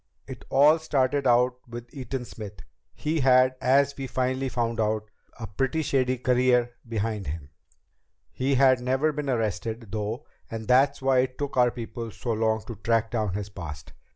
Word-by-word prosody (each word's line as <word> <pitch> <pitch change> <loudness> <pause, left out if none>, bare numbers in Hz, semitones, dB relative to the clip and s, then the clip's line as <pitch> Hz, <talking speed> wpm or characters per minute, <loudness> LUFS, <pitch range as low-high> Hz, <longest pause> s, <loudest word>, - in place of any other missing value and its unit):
"It - - -9
all 150 +4 +5
started 140 -3 +1
out 125 +1 +3
with 120 0 -9
Eaton 130 -1 -5
Smith. 105 -3 -9 0.3
He 155 +1 -1
had, 130 -1 +5
as 140 +2 +3
we 135 -1 -5
finally 130 +1 -1
found 115 -2 -2
out, 110 -1 -1 0.3
a 115 - -5
pretty 135 - -1
shady 130 -2 +1
career 125 -1 +2 0.2
behind 110 -2 -2
him. 70 -1 -6 0.8
He 135 +1 0
had 130 -1 +5
never 130 +5 +1
been 150 -1 -4
arrested, 110 -1 -2
though, 110 +5 -3 0.2
and 110 -1 -6
that's 135 +2 +3
why 135 -1 +4
it 130 0 -1
took 145 -1 -4
our 125 -1 +5
people 115 0 -6
so 120 +3 -5
long 110 -1 0
to 115 - -8
track 115 +2 0
down 110 -5 -1
his 105 0 -4
past. 80 -6 -8
125 Hz, 170 wpm, -26 LUFS, 110-130 Hz, 0.8 s, all